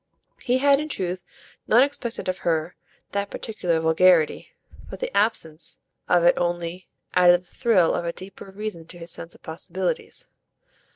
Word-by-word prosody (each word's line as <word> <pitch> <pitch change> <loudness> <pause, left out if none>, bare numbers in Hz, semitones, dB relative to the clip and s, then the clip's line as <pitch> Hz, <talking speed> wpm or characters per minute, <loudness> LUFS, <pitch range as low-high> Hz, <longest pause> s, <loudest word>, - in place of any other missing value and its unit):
He 250 +1 +2
had 280 +1 +4
in 305 +1 -4
truth 180 -6 -3 0.4
not 240 +4 +6
expected 255 -7 -3
of 185 0 -1
her 165 0 -1 0.4
that 200 0 -2
particular 180 -7 -2
vulgarity, 160 0 +3 0.4
but - - -8
the - - -4
absence 165 -8 0 0.3
of 175 -1 +4
it 175 - +6
only 175 +1 -2 0.3
added 180 -1 +6
the - - -26
thrill 205 -4 +2
of - - -1
a 170 - -1
deeper 195 +2 -11
reason 195 -4 -6
to 175 - -10
his 170 0 -6
sense 165 - -7
of - - -21
possibilities. 175 +3 -4
180 Hz, 160 wpm, -24 LUFS, 170-215 Hz, 0.4 s, not